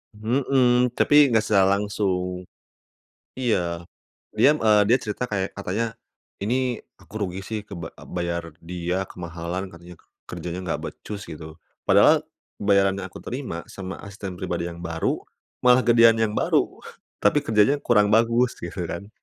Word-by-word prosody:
Mhm, 125 +2 +2
tapi 145 -2 +6
nggak 110 -2 +3
secara 100 -1 +4
langsung, 90 -3 -2 0.9
iya, 90 -9 -1 0.5
dia, 150 +2 +4
eee, 105 -4 +4
dia 125 - +6
cerita 120 0 -4
kayak 95 -2 -2
katanya, 100 +3 -2 0.6
ini 125 +3 0 0.2
aku - - -20
rugi 95 -1 -3
sih 110 -1 -3
ke 100 - -10
ba 85 -1 -7 0.2
bayar 85 -2 -3
dia 90 +2 -3
kemahalan 90 +1 -6
katanya 85 0 -13 0.3
kerjanya 90 +1 -5
nggak 85 - -2
becus 105 -1 -7
gitu 80 0 -9 0.3
padahal, - - +5 0.3
bayaran 100 -1 +3
yang 100 - -5
aku - - -11
terima 125 -10 -5
sama 95 -1 -7
asisten 100 -1 -7
pribadi 85 0 -2
yang 85 0 -7
baru 80 -1 -2 0.4
malah 125 0 +6
gedean 115 -1 +6
yang 110 -1 +1
baru - - +1 0.4
tapi 105 +8 +3
kerjanya 110 +6 +3
kurang 105 -6 +3
bagus 115 +2 +3
gitu 95 - -7
kan. 100 +4 -5
100 Hz, 145 wpm, -24 LUFS, 90-115 Hz, 0.9 s, tapi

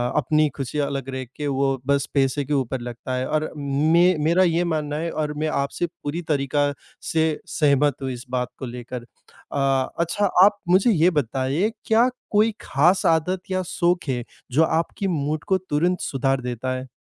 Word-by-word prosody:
अपनी 150 +1 +2
खुशी 135 +1 -3
अलग 140 -2 -2
रख 130 -2 -5
के, 150 - -3
वो 135 -1 0
बस 140 0 +2
पैसे 135 0 +1
के 150 - -2
ऊपर 130 -2 -1
लगता 120 +2 -6
है 130 +1 -1
और 155 0 -1
मे 155 +6 +3
मेरा 170 +4 +4
ये 170 0 +2
मानना 155 -3 -2
है, 165 +2 -2
और 150 -1 -2
मैं 155 +1 -2
आपसे 140 +3 -1 0.2
पूरी 150 +4 -3
तरीका 145 +1 +1 0.4
से 160 0 +2 0.2
सहमत 145 -2 +2
हूँ 135 - -2
इस 120 +1 -7
बात 125 -1 -1
को 130 - -4
लेकर। 120 0 -7 0.5
अ, 135 -1 +1
अच्छा 170 +5 +1 0.2
आप 205 +1 +5
मुझे 190 +6 +5
ये 175 -2 +4
बताइए, 140 - 0
क्या 225 +2 +4 0.2
कोई 215 +2 +3
खास 175 +7 +2
आदत 165 +3 +2
या 185 0 +1
शौक 175 +1 +1
है, 120 -2 -1 0.3
जो 155 +6 +4
आपकी 165 +5 -1
मूड 155 -3 -1
को 190 - +3
तुरंत 180 0 0
सुधार 135 0 0
देता 125 +1 -3
है? 130 +1 -6
145 Hz, 180 wpm, -23 LUFS, 135-170 Hz, 0.5 s, आप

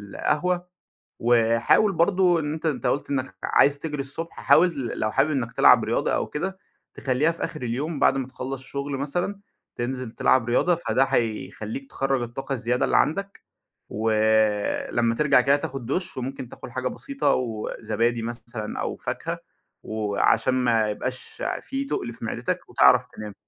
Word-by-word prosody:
القهوة 180 +3 0 0.5
وحاول 115 - +4
برضه 175 0 +3
إن 150 0 -2
أنت 160 +1 -6
أنت 150 - -1
قلت 140 - -1
إنك 130 -9 -2
عايز 140 0 +4
تجري 150 -3 -4
الصبح 155 +5 -6
حاول 165 -7 +4
لو 110 - 0
حابب 135 +6 +2
إنك 125 -5 -2
تلعب - - +6
رياضة - - 0
أو - - -1
كده، 190 +5 -4 0.3
تخليها 135 +5 +1
في 170 - -6
آخر 155 - -8
اليوم 140 +6 -2
بعد - - +4
ما 130 -1 -2
تخلّص 130 0 -6
شغل 140 +1 -4
مثلًا، 175 +8 -2 0.4
تنزل 125 0 -3
تلعب 120 0 +2
رياضة، 175 +8 +3
فده 135 -5 +1
هيخليك 110 +2 -2
تخرَّج 135 -1 0
الطاقة 120 +4 -4
الزيادة 125 0 0
اللي - - +2
عندك، 195 +5 0 0.5
ولمَّا 110 +1 +1
ترجع 140 -1 +4
كده 140 +3 +4
تاخد 135 -3 -5
دُش، 175 +7 -2
وممكن 130 0 -5
تاكل - - -10
حاجة 130 +1 -1
بسيطة 275 - -2
و 115 -4 -3
زبادي 115 +2 0
مثلًا 115 -2 -5
أو - - -3
فاكهة، - - -4 0.4
وعشان 110 +3 +1
ما 115 -4 +2
يبقاش 130 +5 -5 0.2
في 275 +1 -4
تُقل 120 - -3
في 115 - -9
معدتك 110 - -3
وتعرف 65 0 +5
تنام، 105 -1 -9
130 Hz, 155 wpm, -25 LUFS, 115-150 Hz, 0.5 s, تلعب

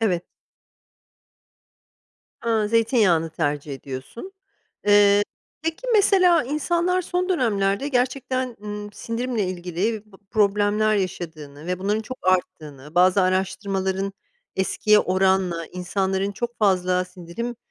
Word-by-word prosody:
Evet. 180 -6 +1 2.2
A, 225 -2 +1
zeytinyağını 215 -8 +3
tercih 145 -3 -2
ediyorsun. 135 - -8 0.5
Eee, 205 0 +6 0.4
peki 325 +9 -3
mesela, 370 -5 +5
insanlar 340 +6 0
son 360 +1 -1
dönemlerde 220 - +1
gerçekten, 255 -1 -1
ııı, 210 0 -5
sindirimle 230 0 -2
ilgili 185 +4 -2
bı - - -14
problemler 210 +1 +2
yaşadığını 160 -6 -5
ve 180 0 -2
bunların 205 +3 0
çok 255 +3 -8
arttığını, 155 -5 -2
bazı 185 +2 +5
araştırmaların 190 +1 -1 0.4
eskiye 210 +2 +3
oranla 185 -3 +1
insanların 190 +2 -2
çok 240 +3 -5
fazla 185 -3 +2
sindirim, 185 +6 -6
200 Hz, 100 wpm, -23 LUFS, 180-235 Hz, 2.2 s, Eee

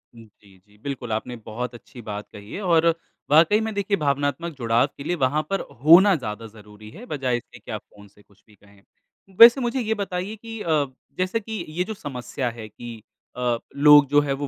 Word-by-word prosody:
जी, 105 -3 -18
जी। 105 +3 -27
बिल्कुल, 130 -5 -5
आपने 120 +3 -3
बहुत 120 +2 -5
अच्छी 120 +1 -13
बात 105 -1 -7
कही 105 +1 -12
है 205 - -5
और 170 -3 +3 0.4
वाक़ई 165 +8 +5
में 220 -1 -3
देखिए 200 0 0
भावनात्मक 145 +2 -1
जुड़ाव 120 +2 +2
के 140 - -8
लिए 175 +3 -1
वहाँ 145 +4 +2
पर 195 - 0 0.2
होना 180 +5 +7
ज़्यादा 115 -4 -6
ज़रूरी 105 0 -15
है, 210 - -12
बजाए 130 - -1
इससे - - -13
कि - - -11
आप - - -4
फ़ोन 100 0 -18
से 105 +1 -23
कुछ 100 0 -28
भी 105 - -21
कहें, 100 0 -23 0.6
वैसे 240 +3 +9
मुझे 240 +2 -1
ये 220 -2 0
बताइए 200 0 -4
कि 225 0 -9
अ, 155 -3 +1 0.3
जैसे 185 +5 0
कि 215 -4 -6
ये 175 +4 -2
जो 220 - -6
समस्या 130 - -5
है 115 -2 -9
कि 115 -1 -10 0.4
अ, 120 -1 0 0.2
लोग 145 0 +7
जो 145 0 +5
है 140 -1 -1
वो 140 +1 -4
140 Hz, 205 wpm, -23 LUFS, 115-180 Hz, 0.6 s, वैसे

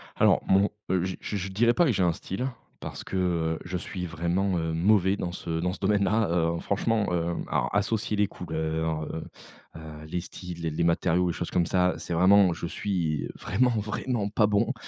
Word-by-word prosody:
Alors - - +4
mon 100 +2 +4 0.2
je 95 0 0
je 105 - -3
je 95 0 -4
dirais 115 +5 +3
pas 175 - +4
que 140 - +3
j'ai 95 -4 +1
un 85 -2 +3
style 110 +10 -4 0.3
parce - - -7
que, - - -5
heu, 85 -3 0
je 90 +1 -3
suis 90 +1 -5
vraiment, 85 +3 0
heu, 80 -1 -1
mauvais 95 +3 +3
dans 90 -3 -3
ce 85 -2 -3
dans 90 +1 0
ce 95 - -7
domaine-là, 105 +1 +2
heu, 85 -1 +1
franchement, 105 +3 0
heu, 85 0 0 0.2
alors, - - 0
associer 105 +1 0
les 105 0 +3
couleurs, 80 -3 -2
heu, 80 +1 -5 0.5
heu, 80 -1 -9
les 85 +3 -3
styles, 90 -1 -8
les 80 - -1
les 80 +2 -1
matériaux, 85 +1 +2
les - - -1
choses 85 - -4
comme 85 - +1
ça, 90 +1 +2
c'est - - -5
vraiment 95 +1 +5
je 85 - -5
suis 85 -5 -1
vraiment, 125 0 +2
vraiment 105 0 -2
pas 105 0 +3
bon. 105 +5 +1
90 Hz, 200 wpm, -27 LUFS, 85-100 Hz, 0.5 s, vraiment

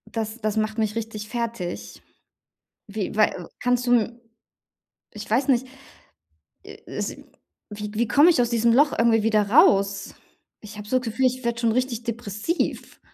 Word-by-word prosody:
das 220 +1 -3
das 215 0 -1
macht 215 0 -1
mich 215 -1 -1
richtig 215 -2 -5
fertig. 230 -7 -5 0.9
Wie 205 -1 -4
wei 210 -4 +1
kannst 245 0 0
du - - +2
m 235 +1 +1 0.9
ich 210 -1 -9
weiß 250 +6 +1
nicht. 260 -1 +2 1.0
Äh, - - -11
es - - -5 0.5
wie 210 0 -6
k 210 - -8
wie 235 - +2
komme 290 +8 +6
ich 320 -8 +4
aus 240 - 0
diesem 235 -1 +2
Loch 285 +4 +4
irgendwie 230 -2 +3
wieder 215 -2 +2
raus? 200 - +3 0.5
Ich 215 0 -11
habe 210 0 -9
so 255 - +2
das 255 - -9
Gefühl, 235 +4 0
ich 255 0 -4
werde 235 0 -1
schon 230 -1 +2
richtig 245 -1 -1
depressiv. 230 - -3
230 Hz, 170 wpm, -24 LUFS, 210-245 Hz, 1.0 s, komme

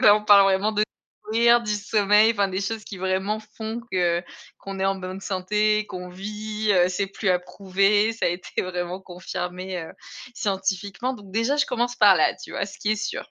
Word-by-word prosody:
donc - - -8
là 205 0 +8
on 210 - -5
parle 205 -1 +8
vraiment 195 +3 +2
de 210 0 +2 0.4
courir, 235 +2 +4
du 215 - -4
sommeil, 210 +1 +3
enfin, 200 -3 +1
des 190 0 -3
choses 215 +2 -3
qui 200 - -8
vraiment 190 +3 -1 0.2
font 220 +1 -4
que 175 -2 +2 0.4
qu'on 195 -1 -7
est - - +1
en 195 0 +1
bonne 185 0 -6
santé, 210 +3 0
qu'on 180 -2 -7
vit, 210 +3 -3
heu, 180 -2 +4
c'est 185 +2 -1
plus 195 +1 -3
à 180 -1 +4
prouver, 195 +4 +1
ça 225 - -1
a - - +3
été 175 +1 -4
vraiment 180 0 -4
confirmé, 180 0 -5
heu, 160 - -9 0.4
scientifiquement. 200 +3 -2
Donc, 205 -5 -13
déjà, 230 +7 +1
je 290 - +2
commence 245 0 -1
par 205 -5 +6
là, 155 - +3
tu - - -10
vois? - - -2
Ce 200 - -11
qui 215 - +1
est - - -1
sûr - - -5
200 Hz, 210 wpm, -24 LUFS, 185-215 Hz, 0.4 s, là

